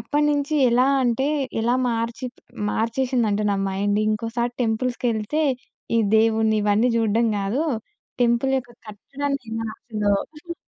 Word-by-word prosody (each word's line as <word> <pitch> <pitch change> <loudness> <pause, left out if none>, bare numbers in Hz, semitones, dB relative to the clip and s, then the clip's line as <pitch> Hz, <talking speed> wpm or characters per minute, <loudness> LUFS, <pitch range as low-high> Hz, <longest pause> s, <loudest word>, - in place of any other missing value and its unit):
అప్పటినుంచి 295 0 0 0.2
ఎలా 250 +2 +4 0.2
అంటే 245 +2 +1 0.3
ఎలా 240 +2 +2
మార్చి 230 +3 -2 0.4
మార్చేసిందంటే 230 -2 0
నా - - 0
మైండ్ 205 +2 0
ఇంకోసారి 230 +3 -1
టెంపుల్స్‌కెళ్తే, 240 +3 -1 0.5
ఈ - - +4 0.2
దేవుడ్ని 220 0 +3
ఇవన్నీ 210 +4 +3
చూడడం 225 +1 +2
కాదు 200 +7 -1 0.6
టెంపుల్ 235 +3 +2
యొక్క 245 -2 -9 0.2
కట్టడాన్ని 275 +7 -4
ఈ - - -6
మా - - -3
అసలు 210 -3 -2 0.2
హుహు. 340 +3 -8
235 Hz, 125 wpm, -23 LUFS, 220-260 Hz, 0.6 s, ఎలా